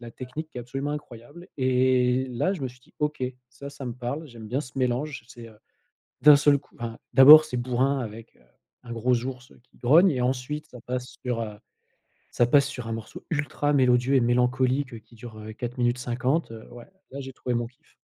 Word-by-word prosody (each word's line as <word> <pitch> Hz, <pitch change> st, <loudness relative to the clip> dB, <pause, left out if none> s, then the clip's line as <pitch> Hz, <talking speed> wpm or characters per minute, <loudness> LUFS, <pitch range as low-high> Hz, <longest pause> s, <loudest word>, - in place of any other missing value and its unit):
la 120 Hz, -1 st, -9 dB
technique 130 Hz, +7 st, -7 dB
qui -, -, -16 dB
est -, -, -4 dB
absolument 135 Hz, +4 st, -4 dB
incroyable 145 Hz, +3 st, -9 dB
et 130 Hz, 0 st, +2 dB
là 125 Hz, +10 st, 0 dB
je 155 Hz, -, -7 dB
me 130 Hz, -, -1 dB
suis 125 Hz, 0 st, -16 dB
dit: -, -, -27 dB
«OK, 150 Hz, -3 st, -1 dB, 0.3 s
ça, 140 Hz, -, -10 dB
ça 140 Hz, -1 st, -9 dB
me 120 Hz, -, -3 dB
parle, 130 Hz, +6 st, -5 dB
j'aime 115 Hz, -5 st, -11 dB
bien 130 Hz, +4 st, -1 dB
ce 125 Hz, 0 st, -9 dB
mélange» 130 Hz, +1 st, -1 dB
c'est, 120 Hz, -3 st, -11 dB
heu, 110 Hz, -, -18 dB, 0.6 s
d'un 150 Hz, -1 st, +9 dB
seul 145 Hz, -1 st, +4 dB
coup 140 Hz, -, -27 dB
enfin, 115 Hz, -1 st, -5 dB, 0.2 s
d'abord 145 Hz, +5 st, +10 dB
c'est 125 Hz, -5 st, -4 dB
bourrin 130 Hz, +3 st, 0 dB
avec, 115 Hz, -1 st, -8 dB
heu, -, -, -27 dB, 0.4 s
un 120 Hz, -1 st, -7 dB
gros 120 Hz, +1 st, 0 dB
ours 125 Hz, -1 st, -7 dB
qui -, -, -27 dB
grogne 160 Hz, +10 st, +5 dB
et 130 Hz, -, -2 dB
ensuite 130 Hz, +4 st, -2 dB
ça 125 Hz, -, -12 dB
passe 125 Hz, +1 st, -5 dB
sur, 120 Hz, -2 st, -1 dB
heu, 105 Hz, -2 st, -6 dB, 0.8 s
ça 120 Hz, -, +3 dB
passe 140 Hz, +3 st, +4 dB
sur 125 Hz, -5 st, -7 dB
un -, -, -3 dB
morceau 115 Hz, -1 st, -8 dB
ultra 145 Hz, -1 st, -1 dB
mélodieux 125 Hz, -1 st, +3 dB
et -, -, +5 dB
mélancolique, 125 Hz, +2 st, +1 dB
heu, 115 Hz, -, -7 dB
qui 110 Hz, +2 st, -21 dB
dure, 115 Hz, -1 st, -11 dB
heu, 110 Hz, +1 st, -8 dB
4 120 Hz, +3 st, -6 dB
minutes 120 Hz, 0 st, +1 dB
50, 125 Hz, +6 st, -1 dB
heu, 110 Hz, -1 st, -10 dB
ouais 120 Hz, -1 st, -11 dB, 0.3 s
là, 140 Hz, -, -6 dB
j'ai 135 Hz, -1 st, -8 dB
trouvé 125 Hz, -1 st, -4 dB
mon 120 Hz, 0 st, -1 dB
kiff. 125 Hz, +2 st, -22 dB
125 Hz, 220 wpm, -26 LUFS, 120-140 Hz, 0.8 s, d'abord